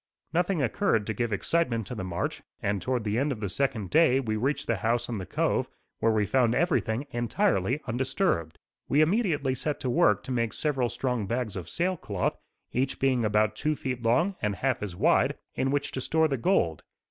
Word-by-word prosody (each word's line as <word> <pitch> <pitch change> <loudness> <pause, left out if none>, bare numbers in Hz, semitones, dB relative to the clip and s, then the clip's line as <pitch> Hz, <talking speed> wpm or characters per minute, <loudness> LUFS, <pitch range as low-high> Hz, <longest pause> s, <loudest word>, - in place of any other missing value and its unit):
Nothing 175 -2 +1
occurred 110 -3 +1
to 110 - -2
give 120 0 -2
excitement 115 0 0
to 115 - -6
the 105 -6 -4
march 90 -2 -3 0.2
and 100 -1 -1
toward 125 +4 -1
the 105 +2 0
end 140 +2 +1
of 120 - -4
the 100 -2 -3
second 120 -4 -1
day 155 -5 +5
we 110 -5 -2
reached 140 +6 -1
the 115 - 0
house 115 +5 0
in 115 -4 -3
the 95 - -6
cove, - - 0 0.3
where 115 - +3
we 110 -1 +2
found 120 +1 +2
everything 140 -7 +1
entirely 120 0 +1
undisturbed. 125 - -1 0.3
We 145 - +4
immediately 155 - +2
set 145 +3 -2
to 125 - -1
work 105 -4 +3
to - - -6
make 115 -3 0
several 135 -5 0
strong 125 -6 -2
bags 120 -1 -2
of 85 -3 -6
sail 180 +2 0
cloth, 100 -4 -2 0.4
each 130 +2 0
being 130 -3 +2
about 110 0 +2
two 150 +7 0
feet 125 -3 -4
long 125 +12 +2
and 105 -2 0
half 130 +2 0
as 100 -4 -4
wide, - - +3 0.2
in 135 - 0
which 145 +1 -1
to 130 - -4
store 160 +4 +2
the 140 - -1
gold. 115 - +1
120 Hz, 205 wpm, -28 LUFS, 110-140 Hz, 0.4 s, day